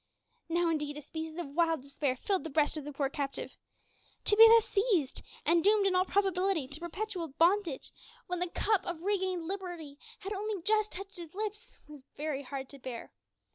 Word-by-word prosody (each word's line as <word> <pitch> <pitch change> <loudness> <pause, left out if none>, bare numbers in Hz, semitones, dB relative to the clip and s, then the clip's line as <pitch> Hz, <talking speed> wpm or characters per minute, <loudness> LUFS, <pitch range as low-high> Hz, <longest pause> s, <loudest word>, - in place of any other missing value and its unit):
Now, 345 +1 +2
indeed, 295 -2 -2
a - - -6
species 320 +2 -6
of 345 -5 -4
wild 325 -3 +2
despair 280 -1 -1
filled 380 +8 -1
the 320 - -5
breast 295 +1 +2
of 305 -3 -3
the 295 - -5
poor 275 -1 0
captive. 275 0 -4 0.7
To 415 - +5
be 450 +1 +11
thus 455 -1 +7
seized, 395 - +1 0.2
and 335 0 +4
doomed 410 0 +5
in 380 -1 +3
all 365 0 +4
probability 380 -6 +1
to 285 - -7
perpetual 350 0 -4
bondage, 335 +1 +1 0.3
when 360 -1 -3
the 360 0 -1
cup 405 +2 +1
of 345 -1 -4
regained 375 -3 0
liberty 345 -6 -5 0.2
had 395 +2 -4
only 415 0 -3
just 430 +1 +2
touched 390 +1 -8
his 340 0 -9
lips, 430 +3 -5
was 295 -3 -12
very 295 -2 -2
hard 270 0 -6
to 280 - -12
bear. 245 -2 -7
345 Hz, 190 wpm, -31 LUFS, 295-395 Hz, 0.7 s, be